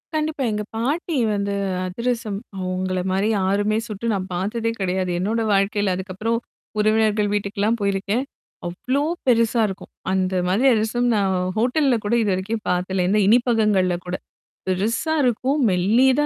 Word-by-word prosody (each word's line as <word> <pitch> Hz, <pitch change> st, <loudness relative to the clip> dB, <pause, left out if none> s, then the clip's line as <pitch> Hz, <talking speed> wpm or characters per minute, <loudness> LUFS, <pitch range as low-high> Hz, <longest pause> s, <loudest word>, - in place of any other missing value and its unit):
கண்டிப்பா. 305 Hz, -2 st, -1 dB
எங்க 210 Hz, 0 st, -2 dB
பாட்டி 295 Hz, +9 st, -1 dB, 0.2 s
வந்து 200 Hz, 0 st, -1 dB, 0.3 s
அதிரசம் 225 Hz, +1 st, -2 dB, 0.2 s
அவங்கள 185 Hz, 0 st, -2 dB
மாரி 195 Hz, +3 st, +1 dB
யாருமே 205 Hz, +3 st, +1 dB
சுட்டு 220 Hz, +2 st, -3 dB
நான் 190 Hz, -1 st, -3 dB
பாத்ததே 215 Hz, +6 st, -1 dB
கிடையாது. 185 Hz, -1 st, -1 dB
என்னோட 220 Hz, +5 st, 0 dB
வாழ்க்கையில 200 Hz, 0 st, +1 dB
அதுக்கப்புறம் 195 Hz, +5 st, -2 dB, 0.4 s
உறவினர்கள் 215 Hz, -1 st, +2 dB
வீட்டுக்கெல்லாம் 205 Hz, +2 st, 0 dB
போயிருக்கேன். 200 Hz, +4 st, 0 dB, 0.4 s
அவ்ளோ 255 Hz, +11 st, -1 dB, 0.2 s
பெருசா 230 Hz, -2 st, +3 dB
இருக்கும். 190 Hz, -1 st, -8 dB, 0.2 s
அந்த 190 Hz, 0 st, 0 dB
மாதிரி 205 Hz, +9 st, +3 dB
அதிரசம் 230 Hz, +3 st, +1 dB
நான் 195 Hz, -2 st, +1 dB, 0.2 s
ஹோட்டல்ல 255 Hz, +3 st, +2 dB
கூட 205 Hz, -, 0 dB
இதுவரைக்கும் 205 Hz, +2 st, -1 dB
பாக்கல 180 Hz, +1 st, 0 dB
இந்த 210 Hz, +2 st, +3 dB
இனிப்பகங்கள்ல 215 Hz, -6 st, +3 dB
கூட. 180 Hz, 0 st, -3 dB, 0.5 s
பெருசா 220 Hz, -, 0 dB
இருக்கும். 255 Hz, +4 st, +1 dB
மெல்லிதா 240 Hz, +10 st, +3 dB
210 Hz, 130 wpm, -22 LUFS, 190-235 Hz, 0.5 s, பெருசா